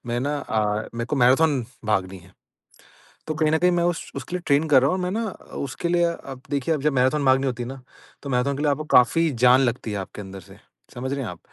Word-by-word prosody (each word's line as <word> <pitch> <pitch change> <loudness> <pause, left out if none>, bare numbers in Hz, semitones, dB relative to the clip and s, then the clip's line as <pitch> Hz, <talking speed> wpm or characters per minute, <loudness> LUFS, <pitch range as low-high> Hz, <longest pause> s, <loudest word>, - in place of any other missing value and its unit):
मैं 120 0 -1
ना 145 +2 -1
अ, 110 -4 -1
मेरे 115 0 -2
को 145 - -2
मैराथन 135 +2 +4 0.2
भागनी 95 -3 -1
है। 90 +1 -19 1.0
तो 155 - -2
कहीं 155 -1 +1
न 160 - +3
कहीं 180 0 +3
मैं - - +1
उस 175 -1 -2
उसके 180 - -5
लिए 180 - -3
ट्रेन 145 +2 +3
कर 135 -3 +6
रहा 135 - +3
हूँ 185 - 0
और 180 - -3
मैं 180 - -2
ना 225 +2 -1
अ, - - -13
उसके 140 +5 -4
लिए 175 0 +3
अब 135 -5 -10
देखिए 145 +3 0
जब 145 +1 0
मैराथन 135 +3 +2
भागनी 135 +1 +3
होती 125 -1 -3
है 120 - -6
ना, 135 0 -9 0.4
तो 140 - -6
मैराथन 135 +2 0
के 145 - -3
लिए 150 - +3
आपको 145 +2 -2
काफ़ी 165 +7 +3 0.2
जान 125 +2 +6
लगती 120 -3 -1
है 105 - -3
आपके 95 +2 -8
अंदर 95 -1 -9
से। - - -14 0.4
समझ 130 +2 -3
रहे 140 - -3
हैं - - -4
आप? 90 -1 -9
135 Hz, 260 wpm, -23 LUFS, 120-155 Hz, 1.0 s, कर